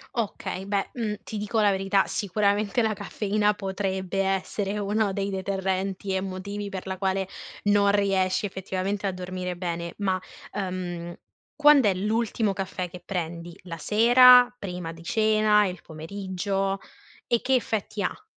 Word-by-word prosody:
Okay. 205 -4 -3
Beh, 200 0 -1
mhmm, 220 -4 -2
ti 215 - -6
dico 210 +2 0
la 205 - +5
verità, 195 0 +2
sicuramente 205 +3 +1
la 220 -1 +1
caffeina 210 +1 0
potrebbe 190 -1 -2
essere 195 +1 -1
uno 205 0 0
dei 200 0 -2
deterrenti 190 0 -2
e 190 - 0
motivi 200 +2 -5
per 190 -1 -6
la 190 - -3
quale 190 0 0 0.4
non 205 -1 +4
riesci 195 -1 +1
effettivamente 190 +1 -3
a 195 - +1
dormire 180 0 -5
bene. 170 -1 -4
Ma, 190 -2 0 0.3
ehm, 175 -3 -4 0.4
quand'è 290 -9 +6
l'ultimo 215 +1 0
caffè 185 -2 -4
che 180 0 -10
prendi? 170 -1 -4
La 170 -2 -7
sera? 245 +5 +7
Prima 180 -6 -5
di 165 - -13
cena? 215 +1 +3
Il 180 -1 -5
pomeriggio? 195 +4 -3 0.5
E 235 - +2
che 265 - 0
effetti 220 -4 -1
ha? 200 - -3
195 Hz, 145 wpm, -26 LUFS, 185-210 Hz, 0.5 s, sera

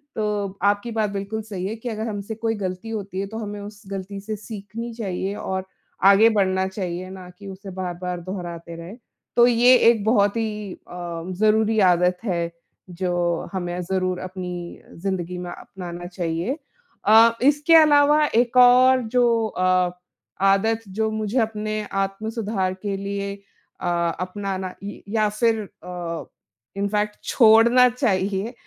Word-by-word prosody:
तो 205 -3 -2
आपकी 205 +3 +1
बात 220 -2 0
बिल्कुल 200 +2 -4
सही 200 -4 -6
है 215 - -4
कि, 230 +2 -6
अगर 220 0 -3
हमसे 205 +1 -5
कोई 225 0 -1
गलती 190 +2 -5
होती 200 -4 -4
है 195 - -2
तो 220 +2 -7
हमें 205 -2 -5
उस 205 0 -10
गलती 195 +1 -5
से 215 +2 -5
सीखनी 215 +2 -7
चाहिए 195 -3 -3
और 190 -2 -3 0.4
आगे 200 +3 +7
बढ़ना 190 -3 +1
चाहिए, 185 -1 -5
ना 185 -1 -10
कि 195 +3 -13
उसे 195 +1 -9
बार-बार 180 -1 -4
दोहराते 170 -2 -6
रहे। 170 +5 -9 0.4
तो 240 - +7
ये 245 +1 +6
एक 225 -4 +2
बहुत 205 -2 +3
ही 210 -3 -3
अ, - - -14 0.4
ज़रूरी 220 +1 +3
आदत 180 -1 +4
है, 170 -5 -1 0.4
जो 175 -1 -1
हमें 175 -1 -3
ज़रूर 185 0 -1
अपनी 180 -2 -6
ज़िन्दगी 180 -1 -3
में 180 0 -6
अपनाना 175 -2 -8
चाहिए। 175 - -2 0.5
अ, 225 +2 +7
इसके 295 +4 +4
अलावा 300 -1 +6
एक 240 +1 +2
और 255 +1 +7
जो 235 -2 +3
अ, 185 -2 +1 0.5
आदत 220 +3 +3
जो 220 +3 -1
मुझे 215 +3 -1
अपने 215 -1 -1
आत्म-सुधार 195 0 -2
के 200 -1 -1
लिए 200 0 -3 0.5
अ, 175 - -2 0.3
अपनाना 185 0 -4
य 205 - -7
या 215 -1 +2
फिर 225 +1 +1 0.2
अ, 175 -2 -5 0.5
इनफैक्ट 210 +1 -1
छोड़ना 235 +2 +6
चाहिए 205 -3 -1
200 Hz, 145 wpm, -23 LUFS, 185-220 Hz, 0.5 s, आगे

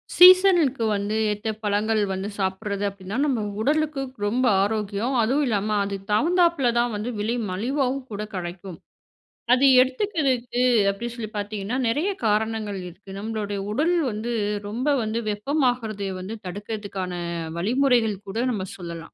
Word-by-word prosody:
சீசனுக்கு 360 -8 +7
வந்து 205 +1 -2 0.2
ஏத்த 210 +1 -3
பழங்கள் 210 +1 +1
வந்து 190 +2 -3
சாப்பிடுறது 195 +1 -2
அப்படின்னா, 195 +2 -7
நம்ம 260 -6 0 0.2
உடலுக்கு 300 +2 +1 0.2
ரொம்ப 245 +5 +1 0.2
ஆரோக்கியம். 210 +3 -1
அதுவும் 265 +7 +2
இல்லாம 210 -1 0
அது 200 0 -3 0.2
தகுந்தாப்பில 335 +2 +3
தான் 240 -1 +1
வந்து 210 +3 -3
விலை 220 +3 0 0.2
மலிவாவும் 260 +6 -1
கூட 210 0 -4
கிடைக்கும். 175 0 -6 0.8
அது 255 +2 +4 0.2
எடுத்துக்கறதுக்கு 260 - 0 0.3
அப்படி 200 +4 -5
சொல்லி 225 -3 -5
பார்த்தீங்கன்னா, 205 +2 -3
நிறைய 295 - +1 0.2
காரணங்கள் 215 -1 0
இருக்கு. 190 +3 -13
நம்மளுடைய 210 -2 -3
உடல் 320 +10 +2 0.2
வந்து 215 +3 -4 0.4
ரொம்ப 245 +6 -3 0.2
வந்து 220 +1 -2
வெப்பமாகறத 225 -3 -1
வந்து 190 +5 -6
தடுக்கிறதுக்கான 200 -1 -5 0.4
வழிமுறைகள் 235 +2 +2
கூட 195 +3 -5
நம்ம 200 -5 -3
சொல்லலாம். 170 -2 -8
220 Hz, 130 wpm, -24 LUFS, 200-255 Hz, 0.8 s, சீசனுக்கு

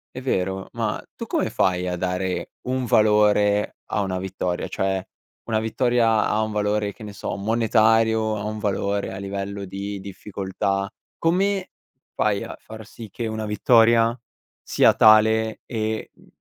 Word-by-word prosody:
È 130 - -5
vero. 95 -6 -1
Ma - - -2 0.2
tu - - -7
come - - -1
fai 90 -1 +1
a 90 - -1
dare 90 +1 -2
un 130 0 -2
valore 105 -2 +3
a 105 - +1
una 95 -2 -2
vittoria? 90 -1 -3
Cioè 95 0 -2 0.4
una 110 -2 0
vittoria 115 0 +2
ha 105 - +1
un 110 - -3
valore, 105 0 0
che - - -19
ne 105 - -7
so, 100 - -4
monetario, 110 +1 +2
ha 100 - -5
un 105 +1 -4
valore 100 -1 -1
a - - -6
livello 100 +1 -5
di 100 +1 -5
difficoltà, 100 0 -3 0.3
come 190 +3 +1 0.4
fai 105 -2 0
a - - -7
far 110 0 -11
sì 115 0 -11
che 115 - -5
una 110 -1 -3
vittoria 115 +2 +4 0.5
sia - - +4
tale 110 +1 +4
e, 110 -2 -3
uhm, - - -23
105 Hz, 155 wpm, -23 LUFS, 100-110 Hz, 0.5 s, vittoria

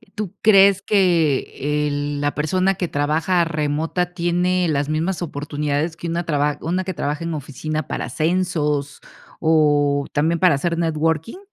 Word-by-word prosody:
¿Tú 205 -2 -5
crees 200 -2 +6
que 150 -6 +1
el 145 0 -2
la 145 0 -1
persona 185 +6 +1
que 180 -1 -2
trabaja 160 +5 +1
remota 160 +3 -2
tiene 180 +1 +1
las 145 -2 0
mismas 165 +4 -1
oportunidades 150 0 -2
que 170 - -6
una 170 +1 -1
traba 150 -2 0
una 180 +3 -1
que 185 0 -4
trabaja 150 0 -3
en 165 0 -3
oficina 155 +1 -4
para - - -3
ascensos 155 -2 -1 0.4
o 145 -3 +2
también 160 +3 +1
para 180 -3 +4
hacer 170 +4 -1
networking? 160 - -1
160 Hz, 145 wpm, -21 LUFS, 145-175 Hz, 0.4 s, crees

